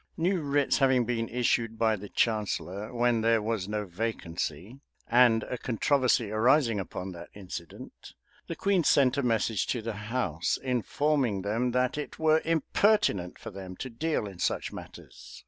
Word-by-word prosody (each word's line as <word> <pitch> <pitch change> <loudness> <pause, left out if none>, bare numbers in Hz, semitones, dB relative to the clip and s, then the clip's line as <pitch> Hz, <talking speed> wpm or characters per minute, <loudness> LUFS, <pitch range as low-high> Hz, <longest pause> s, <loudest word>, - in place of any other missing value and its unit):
New 180 +2 +1
writs 145 -1 +1
having 130 -3 +3
been 115 -1 -2
issued 115 -2 0
by 110 -1 +2
the 100 0 -9
chancellor 105 -2 -1
when 120 -1 +1
there 115 0 +3
was 105 -3 -2
no 105 0 -2
vacancy, 90 - -4 0.3
and 120 -2 +5
a 125 - -5
controversy 125 -2 +1
arising 115 0 +3
upon 95 0 -5
that 85 -1 -10
incident, 90 -4 -9 0.3
the - - -4
queen 195 -3 +1
sent 135 -4 +4
a - - +2
message 115 -4 0
to 125 - -1
the 115 0 -4 0.2
house, 90 -11 -1
informing 130 -3 0
them 115 +5 0
that 125 +3 0
it 150 - -6
were 160 0 +3
impertinent 165 - +1
for - - -9
them 95 -1 -8
to 130 +6 -7
deal 155 +1 -1
in 95 -4 -9
such - - -1
matters. - - -11
115 Hz, 160 wpm, -28 LUFS, 105-130 Hz, 0.3 s, and